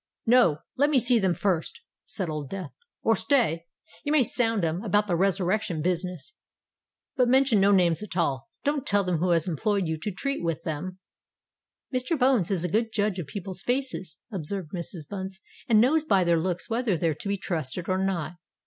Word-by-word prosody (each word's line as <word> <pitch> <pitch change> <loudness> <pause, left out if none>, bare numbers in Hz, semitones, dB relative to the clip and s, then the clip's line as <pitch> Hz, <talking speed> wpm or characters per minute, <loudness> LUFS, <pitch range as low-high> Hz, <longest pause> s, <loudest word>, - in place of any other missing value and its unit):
"No—let 240 - +3
me 295 - +3
see 245 -1 +4
them 190 -4 +1
first!" 180 -5 -1 0.3
said 190 -4 -2
Old 150 -3 -4
Death. 185 -6 -6 0.3
"Or - - +4
stay—you 240 - -1
may 305 -3 +5
sound 225 -5 +1
'em 165 +4 -2
about 205 0 +2
the 180 -4 0
resurrection 185 -2 0
business—but 180 - -4
mention 260 -4 +4
no 200 +1 +5
names 175 -3 +3
at 210 -3 -6
all. 135 -6 0
Don't 290 -1 -1
tell 205 -5 +3
them 180 -2 0
who 180 +2 +1
has 170 0 +2
employed 195 +4 0
you 160 -1 -2
to 210 - -3
treat 275 +4 -3
with 165 -3 -2
them——" 170 +4 -4 1.0
"Mr. 255 +6 0
Bones 255 - +3
is 185 -4 +1
a - - +1
good 220 +5 0
judge 205 -3 0
of 165 - -5
people's 190 +2 -6
faces," 245 - -2
observed 185 -2 -4
Mrs. 170 -4 -6
Bunce; 190 0 -5 0.3
"and 220 -2 +6
knows 295 +7 +4
by 195 -12 +3
their 170 -1 +3
looks 175 +1 -2
whether 230 -5 0
they're 160 0 +1
to 155 - -8
be 200 - 0
trusted 165 -2 -4
or 185 0 +1
not." 175 -3 -2
190 Hz, 185 wpm, -26 LUFS, 170-225 Hz, 1.0 s, and